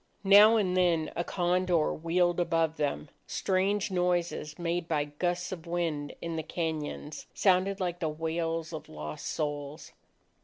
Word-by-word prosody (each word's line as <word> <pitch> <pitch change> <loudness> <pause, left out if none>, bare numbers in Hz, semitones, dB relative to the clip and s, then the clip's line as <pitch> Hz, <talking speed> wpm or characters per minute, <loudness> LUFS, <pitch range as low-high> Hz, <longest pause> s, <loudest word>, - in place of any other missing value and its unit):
Now 205 +3 +8
and 185 -4 +1
then, 170 -4 +2
a 175 - 0
condor 175 -2 +1
wheeled 175 +2 +1
above 165 -2 +1
them. 145 - -2 0.2
Strange 195 +2 0
noises, 175 -4 -1
made 170 -1 -2
by 150 -3 +1
gusts 175 +4 -2
of 170 -2 -7
wind 165 -4 -2
in 165 -1 -3
the 160 - -2
cañons, 155 -2 -4
sounded 190 0 +3
like 175 -2 -2
the 160 - -1
wails 165 +1 -2
of 155 - -7
lost 75 0 -6
souls. 145 0 -4
170 Hz, 145 wpm, -29 LUFS, 155-180 Hz, 0.2 s, Now